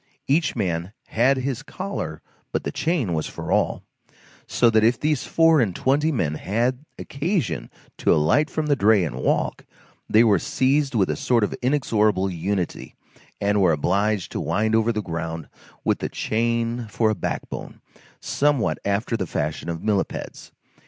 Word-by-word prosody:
Each 150 Hz, +2 st, +1 dB
man 90 Hz, -3 st, -2 dB, 0.2 s
had 130 Hz, +5 st, +3 dB
his 130 Hz, -2 st, -2 dB
collar, -, -, -5 dB, 0.3 s
but -, -, -1 dB
the -, -, -3 dB
chain 150 Hz, -, 0 dB
was 80 Hz, -1 st, -1 dB
for -, -, -6 dB
all; -, -, +1 dB, 0.6 s
so 120 Hz, -2 st, +3 dB
that 110 Hz, -1 st, +4 dB
if 115 Hz, +2 st, +3 dB
these 150 Hz, -3 st, 0 dB
four 165 Hz, -3 st, +4 dB
and 100 Hz, -7 st, 0 dB
twenty 145 Hz, +4 st, +2 dB
men 85 Hz, -, 0 dB
had 120 Hz, -, -1 dB
occasion 140 Hz, -, -2 dB, 0.3 s
to -, -, +2 dB
alight 125 Hz, -, +3 dB
from 155 Hz, -, -2 dB
the 145 Hz, -1 st, +3 dB
dray 105 Hz, -5 st, +4 dB
and 65 Hz, -6 st, -5 dB
walk, 65 Hz, -, 0 dB, 0.5 s
they 110 Hz, +2 st, +6 dB
were 105 Hz, -4 st, +4 dB
seized 140 Hz, -1 st, +1 dB
with 95 Hz, -4 st, +2 dB
a -, -, -1 dB
sort 120 Hz, -3 st, +1 dB
of 105 Hz, -, 0 dB
inexorable 110 Hz, -8 st, +1 dB
unity, 90 Hz, +1 st, -3 dB, 0.4 s
and 100 Hz, 0 st, +2 dB
were 90 Hz, -3 st, +4 dB
obliged 100 Hz, +6 st, 0 dB
to -, -, -3 dB
wind 110 Hz, +2 st, 0 dB
over 110 Hz, +1 st, +3 dB
the 105 Hz, -2 st, -2 dB
ground 80 Hz, -2 st, -4 dB, 0.4 s
with -, -, +1 dB
the -, -, -3 dB
chain 115 Hz, +1 st, -1 dB
for 110 Hz, 0 st, +1 dB
a -, -, -1 dB
backbone, -, -, -5 dB, 0.4 s
somewhat 145 Hz, -4 st, +1 dB
after 100 Hz, +4 st, 0 dB
the 95 Hz, -5 st, -2 dB
fashion 80 Hz, +2 st, -3 dB
of 85 Hz, -1 st, -4 dB
millepeds. 105 Hz, -3 st, -2 dB
110 Hz, 165 wpm, -23 LUFS, 95-130 Hz, 0.6 s, they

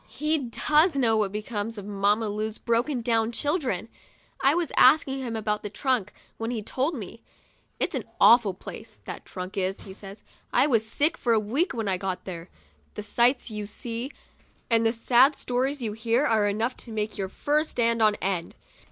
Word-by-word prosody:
He 305 Hz, +1 st, 0 dB
does 300 Hz, +6 st, +2 dB
know 235 Hz, -5 st, +3 dB
what 210 Hz, -3 st, +1 dB
becomes 210 Hz, +1 st, -4 dB
of 200 Hz, -, -7 dB
Mamma 205 Hz, +2 st, +1 dB
Lu's 215 Hz, +1 st, -3 dB
broken 240 Hz, +3 st, 0 dB
down 225 Hz, -1 st, +1 dB
children. 255 Hz, -, -1 dB, 0.5 s
I 275 Hz, +3 st, +4 dB
was 345 Hz, -3 st, -1 dB
asking 270 Hz, 0 st, +5 dB
him 240 Hz, -3 st, -4 dB
about 210 Hz, -1 st, -1 dB
the 210 Hz, -, -5 dB
trunk, 250 Hz, -1 st, -1 dB, 0.3 s
when 225 Hz, 0 st, -2 dB
he 230 Hz, -3 st, -3 dB
told 270 Hz, +9 st, -1 dB
me. 225 Hz, -1 st, -8 dB, 0.3 s
" -, -, -39 dB
It's -, -, 0 dB
an -, -, -3 dB
awful 225 Hz, -5 st, +6 dB
place, -, -, -10 dB
that -, -, -7 dB
trunk 185 Hz, +1 st, -7 dB
is," 190 Hz, 0 st, -1 dB
he 190 Hz, -, -10 dB
said. 195 Hz, +1 st, -11 dB, 0.2 s
" -, -, -38 dB
I -, -, +4 dB
was 230 Hz, -7 st, +2 dB
sick 290 Hz, +8 st, +1 dB
for 235 Hz, -, +2 dB
a 220 Hz, -, +4 dB
week 260 Hz, -, 0 dB
when 225 Hz, -3 st, -2 dB
I 190 Hz, -1 st, +1 dB
got 190 Hz, -1 st, -4 dB
there. 170 Hz, -3 st, -7 dB, 0.5 s
The 210 Hz, -, -5 dB
sights 240 Hz, +4 st, +2 dB
you 210 Hz, -1 st, -5 dB
see 235 Hz, +5 st, -4 dB, 0.6 s
and 230 Hz, 0 st, +4 dB
the -, -, +3 dB
sad 245 Hz, +4 st, +4 dB
stories 260 Hz, +2 st, -2 dB
you 215 Hz, -2 st, -2 dB
hear 230 Hz, +5 st, +1 dB
are 220 Hz, -6 st, +3 dB
enough 225 Hz, +5 st, -1 dB
to 235 Hz, -, -10 dB
make 215 Hz, 0 st, -3 dB
your 190 Hz, -1 st, -2 dB
fur 295 Hz, +8 st, +1 dB
stand 230 Hz, -6 st, 0 dB
on 215 Hz, -1 st, +4 dB
end." 185 Hz, -3 st, -3 dB
225 Hz, 195 wpm, -26 LUFS, 210-255 Hz, 0.6 s, awful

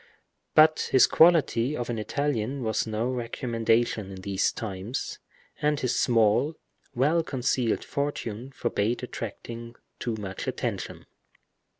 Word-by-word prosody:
But 155 Hz, 0 st, +5 dB
his 130 Hz, -, +7 dB
quality 150 Hz, -5 st, +4 dB
of 120 Hz, -, -3 dB
an 115 Hz, -, -3 dB
Italian 135 Hz, +1 st, -1 dB
was 110 Hz, 0 st, 0 dB
no 110 Hz, +2 st, -1 dB
recommendation 115 Hz, -3 st, 0 dB
in 95 Hz, -1 st, -8 dB
these 95 Hz, 0 st, +1 dB
times, 105 Hz, +3 st, -5 dB, 0.4 s
and 150 Hz, -1 st, +2 dB
his 125 Hz, -1 st, 0 dB
small, 115 Hz, +6 st, +3 dB, 0.4 s
well 150 Hz, +7 st, +3 dB
concealed 125 Hz, -5 st, 0 dB
fortune 135 Hz, -4 st, -3 dB
forbade 120 Hz, -1 st, -1 dB
attracting 115 Hz, 0 st, -7 dB, 0.2 s
too 120 Hz, -2 st, -2 dB
much 95 Hz, -3 st, -6 dB
attention. -, -, -4 dB
120 Hz, 115 wpm, -27 LUFS, 110-135 Hz, 0.4 s, his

